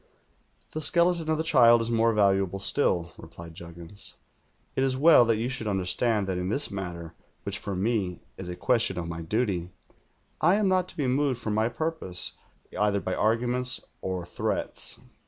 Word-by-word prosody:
"'The 155 Hz, -, -4 dB
skeleton 170 Hz, +1 st, +2 dB
of 155 Hz, -, +2 dB
the 160 Hz, -, -1 dB
child 120 Hz, -7 st, +6 dB
is 115 Hz, +1 st, -2 dB
more 115 Hz, 0 st, +3 dB
valuable 100 Hz, -3 st, +2 dB
still,' 95 Hz, -5 st, +1 dB
replied 85 Hz, 0 st, -11 dB
Juggins. 85 Hz, +3 st, -10 dB, 0.6 s
'It 130 Hz, -, +1 dB
is 130 Hz, -1 st, +1 dB
well 150 Hz, -3 st, +7 dB
that 115 Hz, -1 st, +2 dB
you 115 Hz, +2 st, -1 dB
should 125 Hz, -4 st, -4 dB
under 95 Hz, -3 st, -1 dB
stand 105 Hz, +3 st, +1 dB
that 95 Hz, -2 st, -2 dB
in 90 Hz, +1 st, -2 dB
this 140 Hz, +7 st, -2 dB
matter 85 Hz, -4 st, -6 dB, 0.2 s
— -, -, -41 dB
which -, -, -3 dB
for 100 Hz, -, -4 dB
me 95 Hz, -3 st, -1 dB
is 90 Hz, -2 st, -7 dB
a 90 Hz, -, -4 dB
question 110 Hz, 0 st, +1 dB
of 85 Hz, -1 st, -3 dB
my 85 Hz, 0 st, -5 dB
duty 90 Hz, -1 st, -1 dB, 0.4 s
— -, -, -41 dB, 0.3 s
I 175 Hz, +5 st, +5 dB
am 210 Hz, -1 st, +2 dB
not 185 Hz, -1 st, +2 dB
to -, -, -12 dB
be 145 Hz, -, 0 dB
moved 130 Hz, 0 st, +1 dB
from 110 Hz, -3 st, -3 dB
my 110 Hz, +2 st, +1 dB
purpose 160 Hz, -, -2 dB, 0.4 s
v'ither 105 Hz, 0 st, +1 dB
by 95 Hz, -1 st, -3 dB
arguments 125 Hz, +4 st, 0 dB, 0.2 s
or 95 Hz, -2 st, -3 dB
threats.' -, -, -1 dB
110 Hz, 190 wpm, -27 LUFS, 90-130 Hz, 0.6 s, well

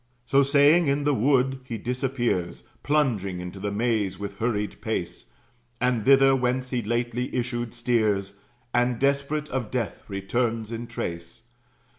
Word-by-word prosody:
So 140 Hz, +2 st, +4 dB
saying, 145 Hz, +4 st, +5 dB
in 140 Hz, +1 st, +1 dB
the 145 Hz, 0 st, +2 dB
wood 130 Hz, +1 st, +2 dB
he 120 Hz, -3 st, -5 dB
disappears, 120 Hz, -8 st, -2 dB
Plunging 115 Hz, -12 st, 0 dB
into 90 Hz, +2 st, -7 dB
the 100 Hz, +1 st, -2 dB
maze 105 Hz, -2 st, 0 dB
with 100 Hz, 0 st, -7 dB
hurried 105 Hz, -3 st, -2 dB
pace; 90 Hz, -6 st, -3 dB, 0.5 s
And 125 Hz, -2 st, +1 dB
thither, 135 Hz, 0 st, +6 dB
whence 125 Hz, 0 st, -1 dB
he 125 Hz, -2 st, 0 dB
lately 120 Hz, +2 st, -2 dB
issued, 120 Hz, -1 st, -2 dB
steers, 105 Hz, -5 st, 0 dB, 0.3 s
And, 120 Hz, 0 st, +2 dB
desperate, 140 Hz, +3 st, 0 dB
of 125 Hz, -5 st, -3 dB
death 120 Hz, -5 st, -3 dB
returns 110 Hz, +3 st, -1 dB
in 115 Hz, +1 st, -5 dB
trace. 85 Hz, 0 st, -6 dB
120 Hz, 140 wpm, -25 LUFS, 105-130 Hz, 0.5 s, thither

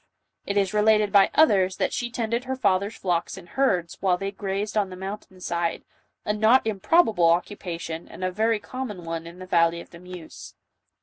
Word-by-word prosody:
It 200 Hz, -, -1 dB
is 195 Hz, 0 st, +1 dB
related 210 Hz, -1 st, +3 dB
by 200 Hz, -2 st, +6 dB
others, 195 Hz, -12 st, +4 dB
that -, -, 0 dB
she 240 Hz, -, -2 dB
tended 235 Hz, +1 st, -2 dB
her 265 Hz, +1 st, -2 dB
father's 200 Hz, -4 st, +1 dB
flocks 175 Hz, 0 st, -1 dB
and 175 Hz, -2 st, -12 dB
herds 180 Hz, -11 st, 0 dB
while 185 Hz, -2 st, +2 dB
they 195 Hz, +1 st, -4 dB
grazed 200 Hz, +1 st, -3 dB
on 205 Hz, -3 st, +1 dB
the 185 Hz, -, -8 dB
mountain 190 Hz, 0 st, -8 dB
side, 170 Hz, -1 st, -2 dB, 0.4 s
a 210 Hz, -, +1 dB
not 220 Hz, +4 st, +4 dB
improbable 215 Hz, -, +3 dB
occupation 170 Hz, -2 st, -2 dB
and -, -, -9 dB
a 185 Hz, -, 0 dB
very 220 Hz, +4 st, +1 dB
common 210 Hz, -7 st, -6 dB
one 165 Hz, 0 st, -4 dB
in 170 Hz, +1 st, -11 dB
the 185 Hz, -, -9 dB
valley 170 Hz, -1 st, +2 dB
of -, -, -12 dB
the 170 Hz, -, -12 dB
Meuse. 180 Hz, -2 st, -11 dB
195 Hz, 190 wpm, -25 LUFS, 175-215 Hz, 0.4 s, by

